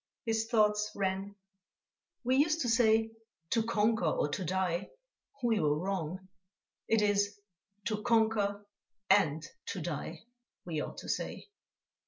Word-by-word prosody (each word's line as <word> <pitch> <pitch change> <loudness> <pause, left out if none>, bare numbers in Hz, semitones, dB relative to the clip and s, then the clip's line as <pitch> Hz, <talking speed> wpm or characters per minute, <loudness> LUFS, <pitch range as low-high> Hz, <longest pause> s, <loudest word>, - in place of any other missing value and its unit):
His 225 -1 0
thoughts 210 -2 +3
ran: 195 +1 -2 0.9
"We 255 +1 +2
used 310 +3 +3
to 245 - 0
say: 225 -1 +4 0.4
To 230 - +3
conquer 220 -2 +1
or 155 -1 +1
to 185 - -3
die. 180 0 -1 0.5
We 230 -3 +3
were 150 -1 +2
wrong; 185 +1 -3 0.6
it 225 -1 +3
is 205 0 +1 0.5
to 215 -2 -1
conquer 210 -3 +2 0.5
and 155 -6 +4 0.2
to 195 - -3
die 160 0 -5 0.4
we 160 -4 -2
ought - - -6
to - - -8
say." - - -3
205 Hz, 130 wpm, -32 LUFS, 185-225 Hz, 0.9 s, say